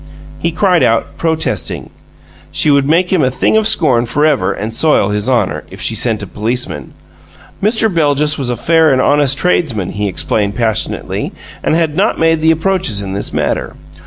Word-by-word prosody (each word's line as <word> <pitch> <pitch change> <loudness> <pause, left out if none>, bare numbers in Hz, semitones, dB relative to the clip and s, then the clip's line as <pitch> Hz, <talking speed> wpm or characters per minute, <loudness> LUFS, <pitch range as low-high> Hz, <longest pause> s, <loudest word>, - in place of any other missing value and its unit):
He 170 - 0
cried 180 +1 +2
out, 115 +5 +1
protesting. 160 -1 -2 0.6
She 150 - +2
would 140 0 +2
make 175 +4 +2
him 180 - +3
a 130 - +2
thing 130 - 0
of 220 -1 +3
scorn 130 - +3
forever 145 -5 +1
and 110 +2 -5
soil 135 -6 +2
his 105 +4 -2
honor, 115 -7 0
if - - -12
she - - +1
sent - - 0
a - - -4
policeman. 110 - -4 0.7
Mr. 220 +2 +2
Beljus 150 -5 +1
was 135 -4 -3
a 120 - -2
fair 160 +4 +3
and 130 - +2
honest 145 0 +2
tradesman, 140 - 0
he 105 0 -2
explained, 100 +2 -1
passionately, 115 -3 -2 0.3
and - - +1
had 160 -3 0
not - - +1
made 165 -1 +2
the 160 - +3
approaches 160 - 0
in 95 -1 -5
this 100 - -4
matter. - - -2
145 Hz, 180 wpm, -14 LUFS, 115-165 Hz, 0.7 s, him